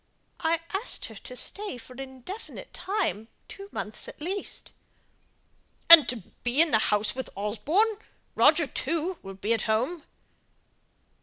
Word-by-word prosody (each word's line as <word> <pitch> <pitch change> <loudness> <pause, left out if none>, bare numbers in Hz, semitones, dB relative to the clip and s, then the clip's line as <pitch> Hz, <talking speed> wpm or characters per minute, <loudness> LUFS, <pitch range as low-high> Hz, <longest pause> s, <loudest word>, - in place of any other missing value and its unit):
I 330 -1 +1
asked 395 +6 -2
her 220 - -11
to 250 - -9
stay 400 +2 -2
for 250 +1 -12
an 250 - -12
indefinite 270 - -9
time; 370 - -2 0.2
two 395 0 -10
months 215 - -4
at - - -11
least." 375 +6 -5 1.2
"And 330 -3 +11
to 250 - +2 0.3
be 245 +3 0
in 325 -1 +5
the 220 - +4
house 210 0 +1
with 260 0 -5
Osborne! 310 - +1 0.4
Roger, 315 +1 +5
too, 335 +6 -2
will 195 0 -9
be 205 +4 0
at 225 - 0
home." 255 +10 0
295 Hz, 145 wpm, -27 LUFS, 230-365 Hz, 1.2 s, And